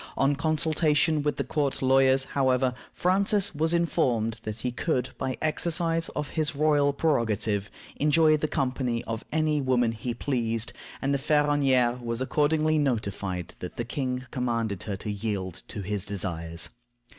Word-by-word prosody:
On 140 +1 +3
consultation 155 +1 +2
with 145 0 -1
the - - 0
court 145 -3 -1
lawyers, 135 0 +4
however, 130 -2 +2 0.2
Francis 195 +2 +2
was 160 +2 +1
informed 125 -10 +1
that 110 0 -6
he 125 - -1
could, 130 -1 -1
by 130 0 -1
the - - -9
exercise 165 +1 +1
of 150 -1 -3
his 155 -1 -1
royal 145 -1 +3
prerogative, 110 -9 0 0.3
enjoy 155 +1 +4
the 155 0 -1
company 125 -4 -1
of 115 -1 -4
any 155 -1 +1
woman 125 -3 +2
he 115 +1 -4
pleased, 115 -4 -1 0.3
and 140 +1 +1
the 140 - +1
Ferronnière 135 -4 +2
was 115 0 -2
accordingly 155 +3 +2
notified 100 - -2
that 90 - -7
the 120 - -2
king 125 0 -3
commanded 115 -7 -1
her 100 - -3
to 105 +2 -5
yield 100 -4 -3
to 100 - -6
his 100 0 -2
desires. 85 -4 -3
130 Hz, 155 wpm, -27 LUFS, 115-150 Hz, 0.3 s, lawyers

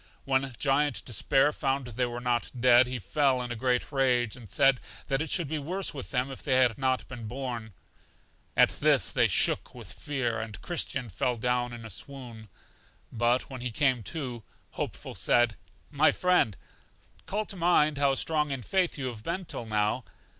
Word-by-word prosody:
When 135 -1 0
Giant 140 -4 +1
Despair 135 +4 +2
found 135 -1 -1
they 125 +1 -2
were 120 0 -5
not 120 -1 0
dead, 125 0 +6
he 125 0 -3
fell 130 - +1
in 125 -1 -4
a - - -3
great 125 +3 0
rage, 125 -5 +1
and 115 -6 -13
said 135 +4 +4 0.3
that 135 0 +1
it 160 - -3
should 170 -5 +2
be 155 +1 -2
worse 180 +7 -2
with 135 -3 -7
them 130 +1 -1
if 135 - -8
they 130 - +1
had 125 -1 +3
not 130 -1 0
been 120 -4 -8
born. 120 -3 -5 0.8
At - - +6
this - - +3
they - - +3
shook - - +1
with - - -9
fear, 130 -6 -2
and 110 -3 -7
Christian 140 -7 -2
fell 120 +5 -1
down 125 +1 0
in 120 -1 -9
a 110 - -8
swoon; 110 +1 -8 0.6
but 120 +2 +1
when 130 -2 -7
he 125 - -2
came 125 +1 +1
to, 130 -8 -4 0.3
Hopeful - - -5
said: 120 -3 +2 0.4
My 150 +1 +4
friend, 180 - +2 0.7
call 210 +2 -1
to 200 - -7
mind 160 -4 +3
how 140 -1 +3
strong 150 +1 0
in 135 -3 -4
faith 185 - 0
you 135 - -4
have 120 -4 -5
been 180 - -3
till 115 - -6
now. 105 +3 0
130 Hz, 185 wpm, -28 LUFS, 120-140 Hz, 0.8 s, dead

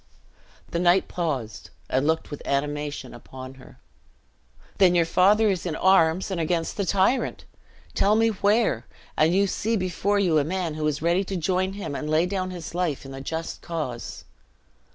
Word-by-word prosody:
The 170 - -1
knight 180 +2 +3
paused, 140 -11 -4 0.2
and 135 +3 0
looked 160 0 0
with 145 - -6
animation 145 -1 -2
upon 130 +2 -10
her. - - -16 1.0
"Then 180 -2 +5
your 170 -1 +4
father 205 +6 +4
is 190 -4 0
in 170 -4 -3
arms, 185 0 +3
and 175 -3 -1
against 165 0 -1
the 200 - -1
tyrant! 195 +8 +1 0.5
Tell 205 +2 +3
me 225 +1 +3
where, 205 - +1 0.3
and 155 +2 +3
you 200 +1 +4
see 220 +3 -1
before 195 +1 0
you 175 -6 +3
a - - +2
man 175 +1 -2
who 155 0 -1
is 150 0 -2
ready 175 +3 +2
to 195 - -4
join 185 +3 0
him, 200 -7 -5
and 150 - -4
to - - -3
lay 160 +2 +3
down 185 0 -2
his 175 -3 -7
life 170 -6 -2
in 135 - -9
the 135 0 -7
just 160 +4 -5
cause!" 150 -8 -5
170 Hz, 180 wpm, -25 LUFS, 150-190 Hz, 1.0 s, Then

